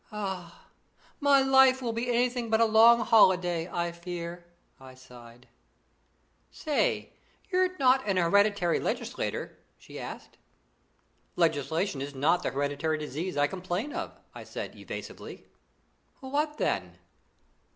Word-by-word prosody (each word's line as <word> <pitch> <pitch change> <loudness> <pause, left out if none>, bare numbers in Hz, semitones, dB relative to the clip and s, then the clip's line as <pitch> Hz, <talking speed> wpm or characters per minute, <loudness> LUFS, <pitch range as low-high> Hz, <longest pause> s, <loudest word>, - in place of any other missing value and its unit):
"Ah! 190 -5 -6 0.5
my 280 -1 +4
life 265 -1 +5
will 240 -3 -3
be 230 +2 -3
anything 245 -1 0
but 220 0 +2
a 230 - +5
long 230 +2 +6
holiday, 180 -6 +3
I 170 0 -2
fear," 170 0 -7 0.4
I 130 -1 -13
sighed. 125 -1 -15 1.0
"Say, 300 -3 -1 0.4
you're 370 0 +1
not 265 -2 +3
an 195 -2 +1
hereditary 185 0 +2
legislator?" 240 +1 -4 0.2
she - - -11
asked. - - -9 1.0
"Legislation 160 0 0
is 140 0 -6
not 155 +6 +2
the - - -1
hereditary 145 +3 -1
disease 155 +4 -5
I 145 - +4
complain 185 - -4
of," - - -6
I - - -9
said - - -7
evasively. - - -9 0.7
"What 295 +3 -2
then?" - - -2
185 Hz, 120 wpm, -28 LUFS, 165-245 Hz, 1.0 s, long